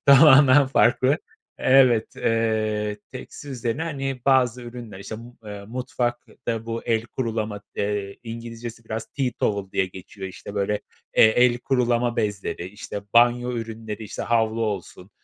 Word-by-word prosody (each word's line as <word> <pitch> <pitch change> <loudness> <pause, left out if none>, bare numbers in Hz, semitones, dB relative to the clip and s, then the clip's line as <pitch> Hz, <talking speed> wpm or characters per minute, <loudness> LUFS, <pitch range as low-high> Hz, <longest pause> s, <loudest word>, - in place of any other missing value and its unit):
tamamen 140 -1 +8
farklı. 130 +2 +3 0.4
Evet, 130 -4 +4
eee, 110 -2 0
tekstil 135 +2 -9
üzerine, 125 +3 -2
hani, 135 -5 -3
bazı 125 -2 +3
ürünler, 120 -5 -9
işte, 105 +3 -7
mu 120 +2 -12
eee, 100 -1 -7
mutfakta 120 -1 -3
bu 115 0 -3
el 115 -2 +1
kurulama, 110 -5 -3
eee, 100 -1 -2
İngilizcesi 115 0 -7
biraz 110 0 -4
tea 135 -3 -1
towel 100 -2 -1
diye 95 - +1
geçiyor. 95 +1 -9
Işte 100 +2 -10
böyle, 105 +1 0 0.4
eee, - - +8
el 120 +2 +4
kurulama 120 -2 +1
bezleri, 100 -4 -2
işte, 100 +1 -7
banyo 120 +1 +4
ürünleri, 115 -2 -5
işte, - - -6
havlu 115 -1 +1
olsun, 100 -2 -5
115 Hz, 140 wpm, -24 LUFS, 105-125 Hz, 0.4 s, tamamen